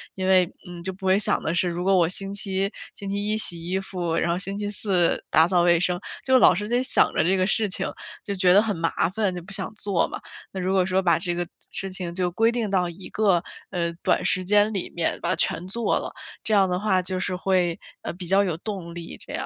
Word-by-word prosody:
因 185 Hz, -1 st, -2 dB
为， 185 Hz, -2 st, +4 dB, 0.2 s
嗯， 175 Hz, -1 st, -9 dB
就 190 Hz, -, -2 dB
不 190 Hz, +1 st, -10 dB
会 190 Hz, +1 st, +4 dB
想 205 Hz, -, +2 dB
的 160 Hz, -, -2 dB
是 175 Hz, +1 st, +1 dB
如 175 Hz, +1 st, -4 dB
果 195 Hz, 0 st, +4 dB
我 170 Hz, -3 st, +3 dB
星 195 Hz, +2 st, +2 dB
期 195 Hz, -1 st, -1 dB, 0.2 s
星 200 Hz, -, -6 dB
期 200 Hz, +1 st, -2 dB
一 215 Hz, -, +1 dB
洗 170 Hz, -6 st, +4 dB
衣 190 Hz, +1 st, 0 dB
服， 180 Hz, -4 st, -3 dB
然 170 Hz, -, 0 dB
后 170 Hz, -, +1 dB
星 195 Hz, +1 st, -4 dB
期 205 Hz, 0 st, -3 dB
四 190 Hz, -4 st, +1 dB
打 160 Hz, +1 st, +5 dB
扫 180 Hz, -1 st, +3 dB
卫 170 Hz, -1 st, +4 dB
生， 180 Hz, +1 st, 0 dB, 0.3 s
就 260 Hz, -1 st, +5 dB
老 -, -, +6 dB
是 205 Hz, +4 st, -3 dB
在 245 Hz, +2 st, +1 dB
想 -, -, +3 dB
着 -, -, +2 dB
这 185 Hz, +4 st, +2 dB
个 185 Hz, 0 st, +1 dB
事 215 Hz, 0 st, +1 dB
情， 190 Hz, +1 st, +2 dB, 0.4 s
就 200 Hz, -, -3 dB
觉 185 Hz, -1 st, +3 dB
得 200 Hz, -, +7 dB
很 215 Hz, -2 st, -1 dB
麻 165 Hz, 0 st, 0 dB
烦， 200 Hz, 0 st, -1 dB
就 175 Hz, -, -6 dB
不 195 Hz, +3 st, -8 dB
想 195 Hz, +1 st, -3 dB
做 200 Hz, -4 st, 0 dB
嘛。 -, -, -6 dB, 0.3 s
那 190 Hz, -, -6 dB
如 185 Hz, +1 st, -1 dB
果 190 Hz, -2 st, +3 dB
说 190 Hz, +1 st, +1 dB
把 170 Hz, -3 st, +3 dB
这 175 Hz, +1 st, -2 dB
个 175 Hz, 0 st, -2 dB, 0.2 s
事 195 Hz, -, -3 dB
情 185 Hz, -2 st, -5 dB
就 180 Hz, 0 st, 0 dB
规 225 Hz, +5 st, +2 dB
定 235 Hz, -3 st, -2 dB
到 185 Hz, -3 st, +1 dB
一 180 Hz, +2 st, -9 dB
个， 195 Hz, -5 st, +2 dB, 0.3 s
呃， 170 Hz, -3 st, -2 dB
短 -, -, +1 dB
时 185 Hz, -, +1 dB
间 210 Hz, +3 st, +3 dB
里 195 Hz, -, -3 dB
面， 170 Hz, -1 st, -1 dB
把 -, -, -2 dB
它 -, -, +2 dB
全 180 Hz, +2 st, -1 dB
做 230 Hz, +3 st, 0 dB
了， -, -, -6 dB, 0.3 s
这 220 Hz, -, -1 dB
样 195 Hz, -2 st, +4 dB
的 180 Hz, -, -1 dB
话 195 Hz, -2 st, +1 dB
就 185 Hz, +1 st, -3 dB
是 185 Hz, 0 st, -2 dB
会， 180 Hz, -1 st, 0 dB, 0.2 s
呃， -, -, -4 dB
比 180 Hz, 0 st, -8 dB
较 195 Hz, +3 st, +4 dB
有 175 Hz, -5 st, -2 dB
动 180 Hz, -3 st, -6 dB
力 170 Hz, -1 st, -8 dB
这 -, -, -9 dB
样。 -, -, -3 dB
185 Hz, 280 characters per minute, -24 LUFS, 175-200 Hz, 0.4 s, 得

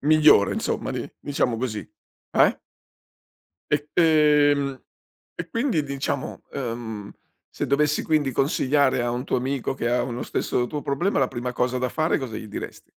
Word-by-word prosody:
migliore, 150 Hz, -8 st, +5 dB
insomma, -, -, -2 dB
di -, -, -4 dB
diciamo 125 Hz, -4 st, 0 dB
così. 115 Hz, -3 st, -4 dB, 0.4 s
Eh? -, -, +4 dB, 1.1 s
E 150 Hz, 0 st, 0 dB
ehm, 150 Hz, -4 st, +4 dB, 0.5 s
e 165 Hz, -, -6 dB
quindi 230 Hz, -, 0 dB
diciamo, 140 Hz, -1 st, -3 dB
uhm, 115 Hz, -5 st, -5 dB, 0.4 s
se -, -, -4 dB
dovessi 150 Hz, +1 st, +2 dB
quindi 150 Hz, -4 st, +1 dB
consigliare 135 Hz, -1 st, +2 dB
a 120 Hz, -, 0 dB
un 120 Hz, +1 st, -3 dB
tuo -, -, 0 dB
amico 135 Hz, +1 st, -2 dB
che 120 Hz, -3 st, -2 dB
ha 120 Hz, +1 st, +2 dB
uno 120 Hz, 0 st, -4 dB
stesso 120 Hz, -, -1 dB
tuo 145 Hz, +3 st, -5 dB
problema, 170 Hz, +8 st, 0 dB
la 135 Hz, -2 st, +2 dB
prima 125 Hz, +1 st, -4 dB
cosa 125 Hz, +1 st, 0 dB
da 125 Hz, 0 st, 0 dB
fare 155 Hz, +6 st, +1 dB
cosa 125 Hz, -6 st, -5 dB
gli 110 Hz, -, -7 dB
dires -, -, -7 dB
135 Hz, 155 wpm, -24 LUFS, 125-150 Hz, 1.1 s, migliore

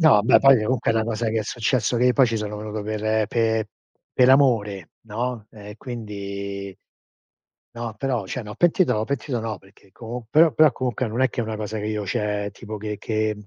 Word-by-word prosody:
no, 145 Hz, -11 st, +6 dB
beh 115 Hz, -, +6 dB
poi 135 Hz, -4 st, +6 dB
comunque 125 Hz, 0 st, 0 dB
è -, -, +1 dB
una 110 Hz, 0 st, +1 dB
cosa 115 Hz, 0 st, -2 dB
che 110 Hz, 0 st, 0 dB
è -, -, -2 dB
successo 120 Hz, +1 st, 0 dB
che 125 Hz, 0 st, +3 dB
poi 135 Hz, -, +5 dB
ci 115 Hz, -1 st, -1 dB
sono 105 Hz, 0 st, -4 dB
venuto 105 Hz, 0 st, -5 dB
per 110 Hz, 0 st, 0 dB
pe 110 Hz, -1 st, 0 dB, 0.5 s
per 125 Hz, 0 st, +5 dB
amore, 110 Hz, -, +2 dB
no, 115 Hz, 0 st, -4 dB
ehm, 105 Hz, -1 st, -11 dB
quindi 100 Hz, -5 st, -6 dB, 1.0 s
No, 115 Hz, -1 st, -4 dB
però 125 Hz, -5 st, -1 dB
cioè 120 Hz, +6 st, -5 dB
no, 105 Hz, 0 st, -8 dB
pentito 175 Hz, +4 st, +3 dB
no 105 Hz, -, 0 dB
pentito 130 Hz, -1 st, -3 dB
no, 110 Hz, -1 st, -4 dB
perché 95 Hz, 0 st, -23 dB
comu 115 Hz, +2 st, -8 dB
però 160 Hz, +2 st, +5 dB
però 155 Hz, -1 st, +5 dB
comunque 125 Hz, -1 st, -2 dB
non 115 Hz, +4 st, -3 dB
è 130 Hz, -, +4 dB
che 120 Hz, -, -4 dB
è -, -, -1 dB
una 110 Hz, -1 st, -4 dB
cosa 110 Hz, 0 st, -4 dB
che 105 Hz, -, -4 dB
io 105 Hz, -2 st, -3 dB
cioè 105 Hz, +1 st, -2 dB
tipo 110 Hz, -2 st, -8 dB
che 105 Hz, 0 st, -5 dB
che 110 Hz, -1 st, -2 dB
110 Hz, 210 wpm, -23 LUFS, 105-125 Hz, 1.0 s, no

